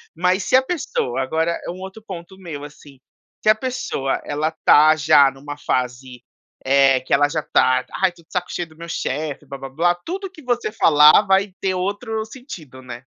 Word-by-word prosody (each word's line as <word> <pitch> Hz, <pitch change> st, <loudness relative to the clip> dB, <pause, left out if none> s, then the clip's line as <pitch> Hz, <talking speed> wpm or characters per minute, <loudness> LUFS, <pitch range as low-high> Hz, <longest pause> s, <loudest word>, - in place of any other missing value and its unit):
Mas 180 Hz, +3 st, +1 dB
se -, -, +2 dB
a 260 Hz, -, +7 dB
pessoa 360 Hz, -, -2 dB
agora 160 Hz, +5 st, -1 dB
é -, -, -5 dB
um 180 Hz, +2 st, -7 dB
outro 190 Hz, +3 st, -9 dB
ponto 190 Hz, -3 st, -10 dB
meu, 160 Hz, -6 st, -8 dB
assim. 145 Hz, -1 st, -13 dB, 0.5 s
Se -, -, +3 dB
a 215 Hz, -, +6 dB
pessoa 215 Hz, -, -3 dB
ela 150 Hz, +2 st, -2 dB
tá 155 Hz, +1 st, +7 dB
já 145 Hz, -2 st, +5 dB
numa 145 Hz, +2 st, -9 dB
fase, 125 Hz, -2 st, -3 dB, 0.4 s
eh, 135 Hz, -1 st, +4 dB
que 130 Hz, -, -3 dB
ela 145 Hz, +1 st, +4 dB
já 155 Hz, +1 st, -2 dB
tá: 130 Hz, 0 st, +2 dB, 0.2 s
"Ai, 190 Hz, -2 st, +3 dB
tô 170 Hz, -, -19 dB
de 160 Hz, -, -35 dB
saco 180 Hz, -1 st, -2 dB
cheio 175 Hz, -2 st, -4 dB
do 155 Hz, -, -20 dB
meu 170 Hz, +1 st, -9 dB
chefe, 150 Hz, -2 st, -4 dB
blá 140 Hz, 0 st, -8 dB
blá 135 Hz, 0 st, -8 dB
blá." 170 Hz, +6 st, +1 dB
Tudo 385 Hz, +2 st, -5 dB
que 325 Hz, -, -15 dB
você 245 Hz, -4 st, -2 dB
falar 155 Hz, -3 st, +6 dB
vai 195 Hz, 0 st, +2 dB
ter 190 Hz, -1 st, 0 dB
outro 205 Hz, +4 st, -3 dB
sentido, 190 Hz, -, -11 dB
né. 125 Hz, -1 st, -10 dB
160 Hz, 200 wpm, -20 LUFS, 140-195 Hz, 0.5 s, a